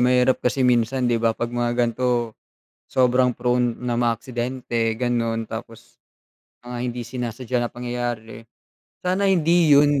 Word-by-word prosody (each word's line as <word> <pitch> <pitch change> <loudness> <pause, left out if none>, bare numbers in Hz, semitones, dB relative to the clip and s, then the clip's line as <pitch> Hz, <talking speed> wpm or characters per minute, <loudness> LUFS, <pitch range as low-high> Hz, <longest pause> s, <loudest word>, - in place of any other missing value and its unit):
mahirap 125 +1 +3
kasi 130 +1 +1
minsan, 125 +1 +2
di 120 -2 +1
ba? 115 -1 +1
'Pag 120 0 -3
mga 120 0 0
ganito, 120 -1 0 0.5
sobrang 125 0 +2
prone 125 0 +1
ng 120 -1 -1
mga 120 -1 +2
aksidente, 120 -1 -2
gano'n. 115 -2 -1
Tapos 115 0 -9 0.7
mga 125 0 -6
hindi 120 -1 -3
sinasadya 125 0 -3
na 120 - -1
pangyayari, 120 -2 -5 0.6
sana 190 +2 +1
hindi 170 -2 +3
yun 145 -1 +4
120 Hz, 140 wpm, -23 LUFS, 115-125 Hz, 0.7 s, yun